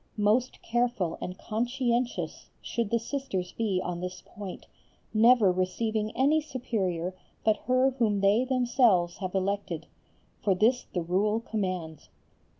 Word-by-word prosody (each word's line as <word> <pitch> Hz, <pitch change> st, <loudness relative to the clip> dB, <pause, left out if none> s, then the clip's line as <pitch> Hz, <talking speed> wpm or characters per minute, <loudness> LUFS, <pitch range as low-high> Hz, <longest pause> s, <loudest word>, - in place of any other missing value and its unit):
Most 215 Hz, +5 st, +1 dB
careful 240 Hz, -7 st, 0 dB
and 180 Hz, 0 st, -5 dB
conscientious 240 Hz, +2 st, -1 dB
should 235 Hz, -3 st, -2 dB
the 235 Hz, -, +2 dB
Sisters 225 Hz, -7 st, -3 dB
be 210 Hz, -5 st, 0 dB
on 175 Hz, -1 st, -3 dB
this 180 Hz, 0 st, -6 dB
point, 200 Hz, -3 st, -8 dB, 0.5 s
never 225 Hz, -2 st, +6 dB
receiving 210 Hz, +4 st, -1 dB
any 295 Hz, +4 st, +4 dB
Superior 190 Hz, -, -2 dB, 0.3 s
but 215 Hz, -1 st, +3 dB
her 255 Hz, +1 st, +4 dB
whom 210 Hz, -4 st, +2 dB
they 200 Hz, +5 st, +4 dB
themselves 240 Hz, -9 st, +3 dB
have 185 Hz, 0 st, -4 dB
elected; 190 Hz, -4 st, -1 dB, 0.6 s
for 195 Hz, -2 st, +3 dB
this 235 Hz, +6 st, +2 dB
the 175 Hz, -, -1 dB
Rule 200 Hz, +6 st, +1 dB
commands. 185 Hz, -8 st, -4 dB
210 Hz, 130 wpm, -28 LUFS, 185-240 Hz, 0.6 s, never